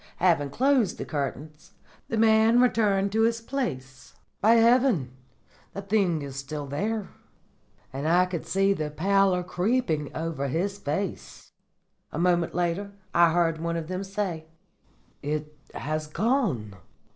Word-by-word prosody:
Having 165 Hz, -5 st, +2 dB
closed 255 Hz, -, +2 dB
the -, -, -5 dB
curtains, 150 Hz, +1 st, -5 dB, 0.3 s
the 225 Hz, -, -2 dB
man 220 Hz, +1 st, +5 dB
returned 205 Hz, -5 st, +2 dB
to 220 Hz, +2 st, +1 dB
his 230 Hz, 0 st, +2 dB
place. 135 Hz, -, -5 dB, 0.3 s
"'By 225 Hz, +3 st, +5 dB
heaven!' 240 Hz, +2 st, +5 dB
he 135 Hz, -, -5 dB
cried, 125 Hz, -, -18 dB, 0.6 s
'the 200 Hz, -, -5 dB
thing 190 Hz, -7 st, +2 dB
is 140 Hz, -1 st, -7 dB
still 145 Hz, +2 st, -5 dB
there!' 205 Hz, +9 st, -3 dB, 0.8 s
And 140 Hz, +3 st, -3 dB
I 175 Hz, +3 st, +4 dB
could 180 Hz, -3 st, -5 dB
see 195 Hz, +1 st, +2 dB
the 155 Hz, -5 st, -3 dB
pallor 190 Hz, +3 st, +2 dB
creeping 180 Hz, -, 0 dB
over 160 Hz, -3 st, -3 dB
his 195 Hz, +8 st, -2 dB
face. 180 Hz, +4 st, -5 dB, 0.6 s
"A -, -, -5 dB
moment 175 Hz, -1 st, +1 dB
later 180 Hz, +3 st, -1 dB, 0.2 s
I 170 Hz, -1 st, +5 dB
heard 165 Hz, -1 st, +1 dB
one 170 Hz, 0 st, -2 dB
of 165 Hz, 0 st, -5 dB
them 185 Hz, +1 st, -3 dB
say, 190 Hz, -5 st, -4 dB, 0.7 s
'It 150 Hz, +1 st, -4 dB, 0.2 s
has 155 Hz, +1 st, -3 dB
gone. 165 Hz, -, -1 dB
175 Hz, 145 wpm, -26 LUFS, 155-210 Hz, 0.8 s, man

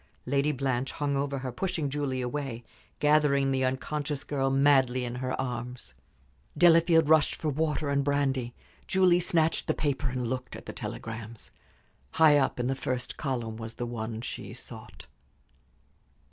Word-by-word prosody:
Lady 140 Hz, +3 st, +1 dB
Blanche 130 Hz, -2 st, -1 dB
hung 145 Hz, -1 st, -1 dB
over 140 Hz, 0 st, -1 dB
her, 130 Hz, -1 st, -4 dB
pushing 165 Hz, +3 st, -2 dB
Julie 135 Hz, -2 st, -2 dB
away, 125 Hz, -2 st, -4 dB, 0.3 s
gathering 145 Hz, -2 st, +3 dB
the 130 Hz, 0 st, +1 dB
unconscious 140 Hz, +2 st, -2 dB
girl 135 Hz, -2 st, -1 dB
madly 135 Hz, -2 st, +3 dB
in 120 Hz, -, -4 dB
her 130 Hz, 0 st, -2 dB
arms. 125 Hz, -, -5 dB, 0.6 s
Delafield 165 Hz, -2 st, +5 dB
rushed 155 Hz, -1 st, +4 dB
for 155 Hz, -, -2 dB
water 155 Hz, +1 st, -1 dB
and 140 Hz, 0 st, +2 dB
brandy. 135 Hz, -4 st, 0 dB, 0.3 s
Julie 185 Hz, -2 st, +4 dB
snatched 165 Hz, -2 st, +1 dB
the -, -, +1 dB
paper 140 Hz, -2 st, -1 dB
and 125 Hz, 0 st, -3 dB
looked 125 Hz, +1 st, -4 dB
at -, -, -10 dB
the -, -, -7 dB
telegrams. 115 Hz, 0 st, -7 dB, 0.6 s
High 150 Hz, -2 st, +6 dB
up 135 Hz, -, 0 dB
in 120 Hz, -, 0 dB
the 130 Hz, -, +1 dB
first 130 Hz, -2 st, -3 dB
column 120 Hz, -6 st, -3 dB
was 115 Hz, 0 st, -7 dB
the 120 Hz, -, -3 dB
one 115 Hz, -1 st, -5 dB
she -, -, -6 dB
sought. -, -, -11 dB
135 Hz, 155 wpm, -28 LUFS, 125-150 Hz, 0.6 s, High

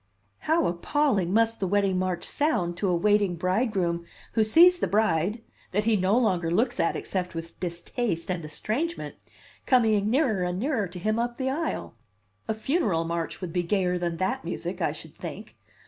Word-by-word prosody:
How 325 Hz, +2 st, +4 dB
appalling 195 Hz, -, +1 dB
must 225 Hz, +2 st, +2 dB
the 190 Hz, -, 0 dB
wedding 195 Hz, -1 st, +2 dB
march 185 Hz, -1 st, -2 dB
sound 285 Hz, -, 0 dB
to 200 Hz, -, 0 dB
a 180 Hz, -, +2 dB
waiting 205 Hz, 0 st, +2 dB
bridegroom 185 Hz, -2 st, 0 dB, 0.3 s
who 225 Hz, -, +3 dB
sees 345 Hz, +11 st, +6 dB
the -, -, +1 dB
bride, 210 Hz, +1 st, +1 dB, 0.3 s
that 210 Hz, +3 st, +2 dB
he 225 Hz, 0 st, +3 dB
no 195 Hz, +3 st, +2 dB
longer 180 Hz, -9 st, +1 dB
looks 230 Hz, +8 st, +1 dB
at 165 Hz, -, +2 dB
except 180 Hz, -2 st, -3 dB
with 165 Hz, 0 st, -7 dB
distaste 175 Hz, +1 st, -3 dB
and 175 Hz, -2 st, -3 dB
estrangement, 230 Hz, -, -3 dB, 0.5 s
coming 220 Hz, -5 st, +3 dB
nearer 245 Hz, -6 st, +2 dB
and 180 Hz, 0 st, -1 dB
nearer 235 Hz, -5 st, 0 dB
to 180 Hz, +1 st, -10 dB
him 215 Hz, +5 st, 0 dB
up 240 Hz, 0 st, -2 dB
the 265 Hz, -1 st, -1 dB
aisle! 320 Hz, +3 st, -3 dB, 0.5 s
A 220 Hz, -, -1 dB
funeral 220 Hz, -, 0 dB
march 165 Hz, +2 st, -3 dB
would 175 Hz, -3 st, -5 dB
be 180 Hz, -, +1 dB
gayer 180 Hz, 0 st, 0 dB
than 170 Hz, -1 st, -2 dB
that 255 Hz, +9 st, -1 dB
music, -, -, -4 dB
I -, -, +1 dB
should -, -, -11 dB
think! -, -, -8 dB
200 Hz, 180 wpm, -26 LUFS, 175-235 Hz, 0.5 s, sees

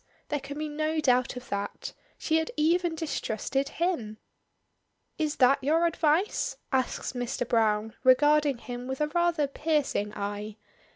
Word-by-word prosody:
There 295 Hz, -, 0 dB
can 280 Hz, +1 st, -8 dB
be 305 Hz, 0 st, -2 dB
no 310 Hz, +1 st, -1 dB
doubt 255 Hz, -4 st, +2 dB
of 250 Hz, 0 st, -9 dB
that. 200 Hz, 0 st, -4 dB, 0.2 s
She 320 Hz, -, +1 dB
had 320 Hz, 0 st, -1 dB
even 335 Hz, +2 st, +2 dB
distrusted 275 Hz, -3 st, -2 dB
him! 290 Hz, -12 st, -2 dB, 1.0 s
"Is 305 Hz, -2 st, 0 dB
that 270 Hz, +1 st, +4 dB
your 320 Hz, +5 st, +3 dB
advice?" 330 Hz, +3 st, +1 dB
asks 260 Hz, -1 st, -1 dB
Mr. 245 Hz, -1 st, -3 dB
Browne, 220 Hz, -2 st, +1 dB
regarding 290 Hz, +1 st, +4 dB
him 245 Hz, +1 st, -7 dB
with 265 Hz, 0 st, -4 dB
a 300 Hz, 0 st, +1 dB
rather 345 Hz, -2 st, +2 dB
piercing 280 Hz, -7 st, -1 dB
eye. 205 Hz, +1 st, -4 dB
280 Hz, 140 wpm, -28 LUFS, 245-310 Hz, 1.0 s, that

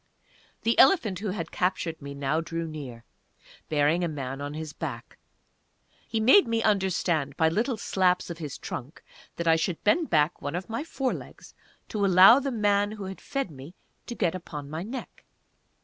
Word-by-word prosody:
The 230 Hz, +1 st, +2 dB
elephant 230 Hz, -, +5 dB
who 210 Hz, -, -4 dB
had 185 Hz, -3 st, -4 dB
captured 180 Hz, -3 st, -1 dB
me 140 Hz, 0 st, -7 dB
now 140 Hz, +3 st, 0 dB
drew 165 Hz, +1 st, -4 dB
near, 130 Hz, -7 st, -8 dB, 0.6 s
bearing 155 Hz, +3 st, +2 dB
a -, -, +1 dB
man 135 Hz, -3 st, -5 dB
on 145 Hz, +1 st, -5 dB
his 155 Hz, -1 st, -6 dB
back; -, -, -7 dB, 0.9 s
he 225 Hz, -, -1 dB
made 260 Hz, -, +6 dB
me 230 Hz, -1 st, 0 dB
understand 175 Hz, -8 st, 0 dB
by 160 Hz, -1 st, +4 dB
little 225 Hz, +8 st, 0 dB
slaps 180 Hz, -3 st, +1 dB
of 170 Hz, -, -8 dB
his 150 Hz, -4 st, -6 dB
trunk 130 Hz, +5 st, -7 dB, 0.3 s
that 170 Hz, -, -3 dB
I 165 Hz, 0 st, +5 dB
should 165 Hz, +1 st, -2 dB
bend 315 Hz, +10 st, +2 dB
back 155 Hz, +1 st, +2 dB
one 145 Hz, +3 st, -4 dB
of 185 Hz, +5 st, -5 dB
my 230 Hz, +6 st, -2 dB
fore 270 Hz, -5 st, -2 dB
legs -, -, -10 dB, 0.4 s
to 210 Hz, -2 st, -2 dB
allow 195 Hz, +6 st, +8 dB
the 280 Hz, 0 st, -2 dB
man 205 Hz, -3 st, +1 dB
who 210 Hz, -2 st, -7 dB
had 190 Hz, 0 st, -7 dB
fed 275 Hz, -, -3 dB
me 140 Hz, +5 st, -11 dB, 0.3 s
to 240 Hz, -, -5 dB
get 180 Hz, -7 st, 0 dB
upon 150 Hz, -5 st, -7 dB
my 160 Hz, +1 st, -4 dB
neck. 235 Hz, +8 st, -7 dB
175 Hz, 180 wpm, -27 LUFS, 155-210 Hz, 0.9 s, allow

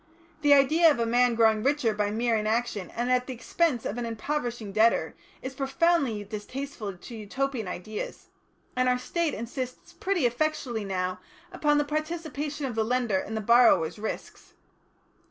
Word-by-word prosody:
The 290 Hz, -1 st, +6 dB
idea 315 Hz, +5 st, +5 dB
of 295 Hz, -, +2 dB
a 235 Hz, -, +1 dB
man 240 Hz, +1 st, +3 dB
growing 220 Hz, -1 st, +4 dB
richer 270 Hz, -3 st, +2 dB
by 210 Hz, -1 st, 0 dB
mere 230 Hz, +2 st, +1 dB
inaction 215 Hz, -2 st, -1 dB
and 240 Hz, +2 st, -1 dB
at 250 Hz, 0 st, +2 dB
the 260 Hz, -, -4 dB
expense 260 Hz, 0 st, 0 dB
of 225 Hz, -, -3 dB
an 240 Hz, -, -2 dB
impoverishing 235 Hz, -2 st, -3 dB
debtor, 220 Hz, +3 st, +2 dB, 0.3 s
is 260 Hz, +1 st, -5 dB
profoundly 270 Hz, -4 st, +1 dB
distasteful 210 Hz, 0 st, -6 dB
to 235 Hz, +6 st, -10 dB
Utopian 230 Hz, +1 st, -3 dB
ideas, 205 Hz, +4 st, -6 dB, 0.5 s
and 255 Hz, 0 st, +2 dB
our 250 Hz, -, +3 dB
State 325 Hz, +5 st, -1 dB
insists 250 Hz, +3 st, -6 dB
pretty 370 Hz, -8 st, 0 dB
effectually 245 Hz, -3 st, -1 dB
now 185 Hz, -1 st, -2 dB, 0.3 s
upon 295 Hz, -5 st, +2 dB
the 295 Hz, -, +2 dB
participation 305 Hz, -1 st, -3 dB
of 255 Hz, -, -3 dB
the 220 Hz, 0 st, +1 dB
lender 235 Hz, -4 st, +1 dB
in 220 Hz, +3 st, -5 dB
the 220 Hz, -, -1 dB
borrower's 235 Hz, -6 st, +4 dB
risks. 220 Hz, -, -6 dB
245 Hz, 160 wpm, -27 LUFS, 220-280 Hz, 0.5 s, The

